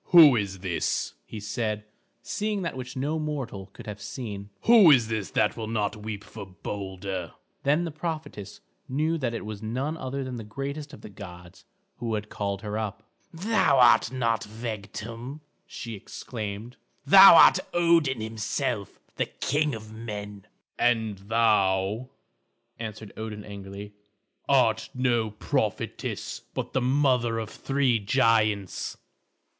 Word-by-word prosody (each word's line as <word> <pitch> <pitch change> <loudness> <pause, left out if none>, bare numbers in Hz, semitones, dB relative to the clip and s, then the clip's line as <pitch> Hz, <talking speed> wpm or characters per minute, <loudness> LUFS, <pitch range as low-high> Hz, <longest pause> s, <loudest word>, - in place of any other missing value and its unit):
"Who 160 -7 +9
is 100 -4 -2
this," 95 -3 -1
he 110 - -7
said, 105 0 -3 0.4
seeing 210 -2 -2
that 170 - -3
which 130 0 -7
no 150 +4 -1
mortal 135 -11 -4
could 95 - -13
have 105 -1 -7
seen; 105 -6 -6
"who 225 -7 +8
is 120 -6 +5
this 110 -6 -2
that - - +2
will 110 -1 -5
not 105 -2 -1
weep 105 -1 -6
for 105 - -9
Balder?" 95 -1 -5 0.3
Then 150 +5 +2
the 165 - -4
prophetess 155 - -6 0.3
knew 155 +5 0
that 120 -4 -1
it 115 - -5
was 105 -1 -6
none 130 +8 -2
other 135 -1 -4
than 130 -2 -5
the 115 - -6
greatest 140 +7 -5
of - - -11
the - - -9
gods 90 -3 -11 0.3
who 115 -2 -2
had 105 0 -5
called 100 0 -3
her 105 +1 -3
up. 110 0 -4 0.3
"Thou 185 -3 +2
art 125 -1 +6
not 115 -3 0
Vegtam," 115 +4 -6 0.3
she 115 -2 -7
exclaimed, 110 +2 -6 0.3
"thou 190 +5 +10
art - - +8
Odin 165 -8 +3
himself, 110 -1 -3 0.2
the - - 0
king 150 -1 0
of 110 0 -10
men." 105 -3 -7 0.3
"And 110 -4 +1
thou," 105 +1 +2 0.7
answered 110 -2 -7
Odin 110 -1 -6
angrily, 100 0 -8 0.6
"art 110 -5 +3
no 120 -3 +1
prophetess, 105 - -2
but - - -4
the 130 - +1
mother 125 -3 +2
of 110 -1 -4
three 135 -4 +1
giants." 110 -3 +1
115 Hz, 140 wpm, -27 LUFS, 105-135 Hz, 0.7 s, thou